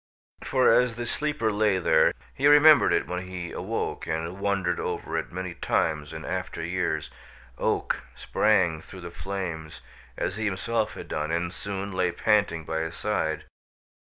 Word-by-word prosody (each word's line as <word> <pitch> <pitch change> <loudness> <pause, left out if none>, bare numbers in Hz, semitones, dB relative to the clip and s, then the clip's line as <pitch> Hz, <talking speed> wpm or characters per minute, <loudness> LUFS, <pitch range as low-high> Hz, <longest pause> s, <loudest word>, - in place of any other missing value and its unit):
For 130 -3 +4
as 125 -1 +3
the 120 0 -4
sleeper 150 -3 0
lay 105 -2 +2
there 90 - +4 0.2
he 140 - +2
remembered 145 +1 +7
it - - +2
when 90 +1 -4
he 90 -2 -6
awoke - - -3
and 80 +4 -3
wondered 100 -3 0
over - - -3
it - - -2
many 90 0 -4
times 75 -3 0
in - - -7
after - - -3
years 85 -3 -1 0.5
Oak - - 0
sprang 90 -7 +2
through 95 +2 -11
the 85 -1 -7
flames, 85 -8 -5 0.4
as 100 - -2
he 110 - -2
himself 105 +3 -1
had - - -8
done, 75 0 -2
and 85 +1 -1
soon 100 0 -4
lay 90 -1 +1
panting 85 -2 +2
by 80 0 -2
his 80 0 -3
side. - - -1
95 Hz, 160 wpm, -27 LUFS, 85-105 Hz, 0.5 s, remembered